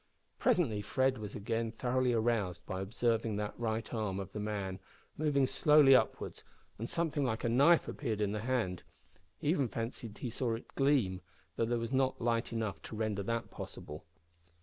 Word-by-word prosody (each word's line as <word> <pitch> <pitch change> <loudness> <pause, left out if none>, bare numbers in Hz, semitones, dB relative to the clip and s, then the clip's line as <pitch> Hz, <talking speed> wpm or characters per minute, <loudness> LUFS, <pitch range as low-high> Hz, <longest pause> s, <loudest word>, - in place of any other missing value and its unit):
Presently 165 - +2
Fred 130 +5 +1
was 105 -2 -6
again 115 +2 -1
thoroughly 125 +2 +1
aroused 110 -6 0
by 95 0 -4
observing 115 +1 0
that 105 0 -3
the - - -11
right 110 0 -2
arm 105 -4 -1
of 95 - -6
the 105 - -5
man 100 -3 -3 0.4
moved 145 -3 +2
slowly 150 -2 +6
upwards, - - 0 0.4
and 115 - -3
something 160 -4 0
like 115 -4 -1
a 120 - +1
knife 140 +8 +5
appeared 115 -7 -3
in 105 -1 +1
the 105 - -2
hand; 110 -7 -1 0.6
he 145 - -2
even 145 -6 +2
fancied 115 -1 -5
he 120 - -4
saw 120 -1 0
it 115 - -11
gleam, 130 -10 +2 0.3
though 115 - +1
there 120 +1 0
was 115 +2 -3
not 130 0 +2
light 115 0 0
enough 110 -3 -2
to - - -8
render 105 -2 -1
that 115 +3 -2
possible. 75 +1 -8
115 Hz, 180 wpm, -33 LUFS, 105-130 Hz, 0.6 s, slowly